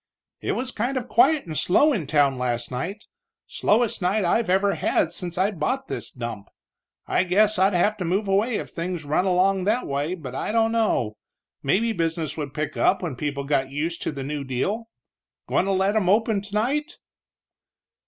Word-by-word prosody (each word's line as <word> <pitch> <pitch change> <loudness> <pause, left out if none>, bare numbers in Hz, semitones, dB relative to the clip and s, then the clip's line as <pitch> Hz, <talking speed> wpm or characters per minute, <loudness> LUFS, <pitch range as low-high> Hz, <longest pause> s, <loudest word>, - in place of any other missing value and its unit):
"It - - -1
was 255 +1 -2
kind 245 +5 -2
of 250 -1 -3
quiet 270 +5 +4
and 160 -3 -6
slow 290 - +4
in 165 - -2
town 140 -3 +2
last 120 -1 -2
night, 190 - -4 0.4
slowest 220 0 +1
night 190 +3 +1
I've 220 +4 +1
ever 195 +2 +3
had 165 - 0
since 175 -1 -5
I 190 +3 +2
bought 255 - -2
this - - -3
dump. 115 -5 -6 0.6
I - - +2
guess 205 +3 +3
I'd 190 0 +3
have 210 +5 +2
to 190 - -3
move 190 +5 0
away 210 +5 +2
if - - -4
things 170 -1 -4
run 155 +6 +1
along 190 +1 +2
that 225 +5 +1
way, 145 +5 -2
but 140 -8 -8
I 135 - -2
don't 225 0 +2
know. 210 - 0 0.4
Maybe 220 +11 +1
business 165 -3 -2
would 145 -3 -4
pick 155 0 -3
up 190 - +2
when 160 -7 -3
people 140 +1 -3
got 135 -2 0
used 155 +5 -3
to - - -2
the 140 -2 -6
new 145 +1 -4
deal. 195 - -2 0.6
Goin' - - +1
to 195 - 0
let 195 +2 +1
'em 195 -5 +2
open 215 0 +2
tonight?" 245 - -2
185 Hz, 190 wpm, -24 LUFS, 150-215 Hz, 0.6 s, quiet